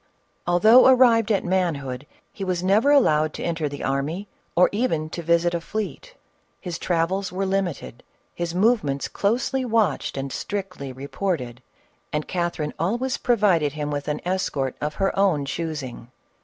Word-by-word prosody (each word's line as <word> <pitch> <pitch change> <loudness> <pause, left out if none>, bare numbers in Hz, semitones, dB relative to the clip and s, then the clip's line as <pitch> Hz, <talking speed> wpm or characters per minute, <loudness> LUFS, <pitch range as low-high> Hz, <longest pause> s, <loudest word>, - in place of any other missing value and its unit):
Although 215 +9 +6
arrived 240 -4 +5
at 200 - +1
manhood, 145 -8 -1 0.3
he 195 - -6
was 180 -2 -1
never 205 +8 +3
allowed 155 - +4
to - - -5
enter 165 -3 -1
the 145 - -7
army, 145 +9 -2 0.3
or 180 - +6
even 165 -9 -1
to 170 - -4
visit 170 +1 +2
a 170 - -1
fleet; 215 - -5 0.4
his 175 -2 -5
travels 180 +2 0
were 190 +2 -2
limited, 190 -10 -2 0.3
his 175 0 -4
movements 185 - +1
closely 240 +5 0
watched 225 - 0
and 135 0 -4
strictly 185 -9 -5
reported, 135 -2 -4 0.5
and 150 0 -2
Catherine 170 -4 -2
always 240 +10 0
provided 190 - +2
him 150 -1 -3
with 145 -1 -3
an 150 0 -2
escort 150 -8 -1
of 150 +1 -2
her 195 0 0
own 185 -8 +2
choosing. 140 -6 -5
175 Hz, 150 wpm, -24 LUFS, 150-200 Hz, 0.5 s, Although